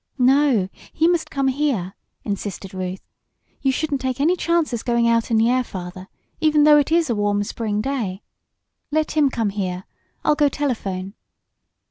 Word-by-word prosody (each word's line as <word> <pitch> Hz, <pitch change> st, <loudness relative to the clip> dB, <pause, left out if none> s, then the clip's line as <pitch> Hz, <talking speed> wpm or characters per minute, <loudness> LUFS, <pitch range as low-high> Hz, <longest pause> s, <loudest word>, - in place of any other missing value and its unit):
"No, 260 Hz, -5 st, +3 dB, 0.2 s
he 320 Hz, -, +2 dB
must 345 Hz, -2 st, +1 dB
come 275 Hz, -1 st, 0 dB
here!" 255 Hz, -10 st, -1 dB, 0.3 s
insisted 200 Hz, -1 st, -5 dB
Ruth. 185 Hz, 0 st, -5 dB, 0.6 s
"You 270 Hz, -, +2 dB
shouldn't 285 Hz, 0 st, -2 dB
take 260 Hz, -1 st, -2 dB
any 325 Hz, +6 st, +3 dB
chances 335 Hz, -9 st, 0 dB
going 235 Hz, -1 st, +1 dB
out 230 Hz, -1 st, +2 dB
in 225 Hz, -, +2 dB
the 225 Hz, +1 st, +4 dB
air, 255 Hz, +1 st, +2 dB
Father, 185 Hz, -3 st, -8 dB, 0.3 s
even 305 Hz, -2 st, +4 dB
though 300 Hz, 0 st, +7 dB
it 290 Hz, -, -1 dB
is 335 Hz, -1 st, +3 dB
a -, -, +1 dB
warm 205 Hz, 0 st, +1 dB
spring 210 Hz, 0 st, -2 dB
day. 220 Hz, -7 st, -3 dB, 0.7 s
Let 310 Hz, +1 st, 0 dB
him 300 Hz, -3 st, +3 dB
come 225 Hz, -5 st, -1 dB
here. 185 Hz, -2 st, -3 dB, 0.4 s
I'll -, -, +5 dB
go 295 Hz, -1 st, +3 dB
telephone." 200 Hz, -10 st, -3 dB
245 Hz, 165 wpm, -22 LUFS, 205-295 Hz, 0.7 s, though